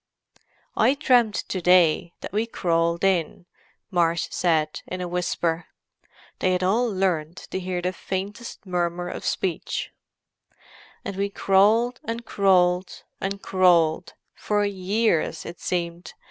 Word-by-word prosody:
"I 275 Hz, -, +4 dB
dreamed 245 Hz, -6 st, +3 dB
to 185 Hz, -, -3 dB
day 175 Hz, -1 st, +4 dB
that -, -, -7 dB
we 220 Hz, +2 st, 0 dB
crawled 170 Hz, -4 st, 0 dB
in," 180 Hz, -3 st, 0 dB, 0.5 s
Marsh 170 Hz, -2 st, +1 dB
said, 155 Hz, -3 st, 0 dB
in 185 Hz, -, -5 dB
a 180 Hz, -, -3 dB
whisper—they 175 Hz, +1 st, -4 dB
had 180 Hz, 0 st, 0 dB
all 230 Hz, +6 st, +2 dB
learned 180 Hz, -4 st, -1 dB
to 190 Hz, -, -5 dB
hear 180 Hz, -1 st, -3 dB
the 180 Hz, +1 st, -1 dB
faintest 200 Hz, +5 st, -6 dB
murmur 175 Hz, -1 st, -2 dB
of -, -, -6 dB
speech. 180 Hz, -4 st, -2 dB, 1.1 s
"And 200 Hz, -, -4 dB
we 200 Hz, +1 st, -1 dB
crawled, 210 Hz, +6 st, +3 dB
and 230 Hz, +1 st, -5 dB
crawled, 180 Hz, -3 st, +2 dB, 0.2 s
and 195 Hz, +1 st, -4 dB
crawled: 175 Hz, -3 st, +3 dB, 0.2 s
for 205 Hz, -1 st, 0 dB
years, 195 Hz, -4 st, 0 dB
it 170 Hz, -, -8 dB
seemed. 170 Hz, -1 st, -3 dB
185 Hz, 125 wpm, -24 LUFS, 170-200 Hz, 1.1 s, I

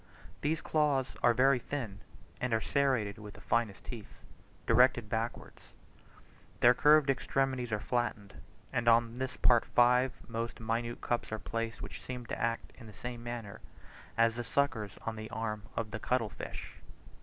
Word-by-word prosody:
These 155 Hz, +2 st, 0 dB
claws 145 Hz, -4 st, +1 dB
are 120 Hz, -, +6 dB
very 130 Hz, +1 st, +5 dB
thin, 115 Hz, -7 st, -5 dB, 0.4 s
and 125 Hz, -2 st, +1 dB
are -, -, +2 dB
serrated 110 Hz, -4 st, +1 dB
with 105 Hz, -1 st, -10 dB
the -, -, -11 dB
finest 115 Hz, -4 st, 0 dB
teeth, 115 Hz, -5 st, -8 dB, 0.5 s
directed 120 Hz, -1 st, +4 dB
backwards: 115 Hz, +1 st, -3 dB, 1.0 s
their 120 Hz, +1 st, +7 dB
curved 150 Hz, +3 st, +5 dB
extremities 130 Hz, -2 st, -1 dB
are 105 Hz, -, 0 dB
flattened, 105 Hz, -3 st, -2 dB, 0.4 s
and 120 Hz, 0 st, 0 dB
on 115 Hz, 0 st, +5 dB
this 130 Hz, +1 st, -4 dB
part 120 Hz, -2 st, +5 dB
five 125 Hz, +1 st, +4 dB, 0.2 s
most 115 Hz, 0 st, -4 dB
minute 115 Hz, +1 st, -2 dB
cups 120 Hz, -2 st, -1 dB
are 110 Hz, -, -1 dB
placed 115 Hz, +1 st, -4 dB
which -, -, -7 dB
seem 125 Hz, -1 st, -6 dB
to -, -, -5 dB
act 115 Hz, 0 st, -1 dB
in 115 Hz, -, -11 dB
the 105 Hz, -, -11 dB
same 120 Hz, +4 st, -6 dB
manner 115 Hz, -3 st, -6 dB, 0.6 s
as 115 Hz, 0 st, +4 dB
the 120 Hz, +1 st, -4 dB
suckers 115 Hz, -7 st, 0 dB
on 115 Hz, -1 st, -3 dB
the 110 Hz, 0 st, -6 dB
arms 110 Hz, -2 st, -3 dB
of 110 Hz, -2 st, -2 dB
the 110 Hz, -, -4 dB
cuttle 115 Hz, -1 st, 0 dB
fish. -, -, -8 dB
120 Hz, 165 wpm, -32 LUFS, 110-125 Hz, 1.0 s, their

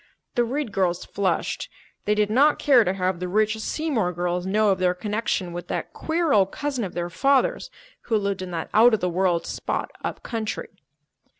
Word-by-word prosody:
The 240 Hz, -, +2 dB
Reed 260 Hz, 0 st, -2 dB
girls 180 Hz, -3 st, 0 dB
flushed. 200 Hz, -2 st, -1 dB, 0.4 s
They 210 Hz, -, +2 dB
did 210 Hz, 0 st, +1 dB
not 285 Hz, +6 st, +4 dB
care 260 Hz, -5 st, +5 dB
to 185 Hz, -, 0 dB
have 185 Hz, -2 st, -1 dB
the 180 Hz, -, -3 dB
rich 215 Hz, +3 st, +1 dB
Seymour 225 Hz, -, -1 dB
girls 175 Hz, +1 st, -2 dB
know 210 Hz, +2 st, +3 dB
of 190 Hz, -, 0 dB
their 180 Hz, -1 st, +2 dB
connection 205 Hz, -2 st, -2 dB
with 175 Hz, 0 st, -6 dB
that -, -, -4 dB
queer 325 Hz, -1 st, 0 dB
old 195 Hz, -2 st, +4 dB
cousin 280 Hz, -4 st, -2 dB
of 190 Hz, -, -5 dB
their 175 Hz, 0 st, -3 dB
father's 280 Hz, -, +2 dB, 0.4 s
who 225 Hz, -, +2 dB
lived 200 Hz, -2 st, -2 dB
in 185 Hz, -, -5 dB
that 165 Hz, -2 st, -5 dB
out 225 Hz, +2 st, +6 dB
of -, -, -4 dB
the 180 Hz, -, 0 dB
world 175 Hz, -1 st, +1 dB
spot -, -, -3 dB
up -, -, -4 dB
country. 225 Hz, -3 st, -4 dB
205 Hz, 195 wpm, -24 LUFS, 180-235 Hz, 0.4 s, out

